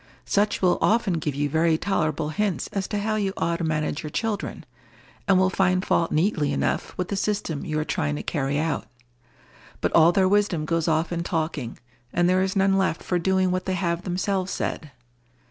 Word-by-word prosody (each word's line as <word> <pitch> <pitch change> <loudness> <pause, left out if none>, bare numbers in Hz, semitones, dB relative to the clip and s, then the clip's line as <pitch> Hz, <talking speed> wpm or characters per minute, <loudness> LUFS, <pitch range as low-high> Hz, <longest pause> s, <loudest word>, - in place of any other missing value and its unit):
Such 205 -1 +1
will 180 -1 +3
often 210 -7 +2
give 150 -2 -3
you 145 +1 0
very 160 +2 +2
tolerable 160 -5 -1
hints 195 +3 -1
as 195 -2 -2
to 210 - -2
how 215 +1 0
you 195 -2 -1
ought 170 0 0
to 170 - -4
manage 155 -2 -1
your 155 - -6
children, 215 +5 -3 0.6
and 195 -1 +5
will 185 0 +3
find 185 0 +2
fault 165 - +1
neatly 155 -3 +1
enough - - -1
with 180 -1 -2
the 200 - -1
system 195 -7 -2
you 155 -1 -2
are 155 - -1
trying 75 - -1
to 75 - -5
carry 140 0 -1
out; 160 +1 -1 0.9
but - - -1
all 165 +1 +7
their 190 +1 +3
wisdom 195 -5 +2
goes 165 +1 0
off 160 +1 +1
in 170 -1 -1
talking, 160 -7 -3 0.3
and 175 0 +2
there 185 +1 +3
is 190 +1 -1
none 195 0 +3
left 190 -4 0
for 180 - 0
doing 190 +1 +2
what 185 0 -1
they 190 - 0
have 170 -2 -1
themselves 185 +1 -1
said. 150 - -3
175 Hz, 200 wpm, -25 LUFS, 155-195 Hz, 0.9 s, all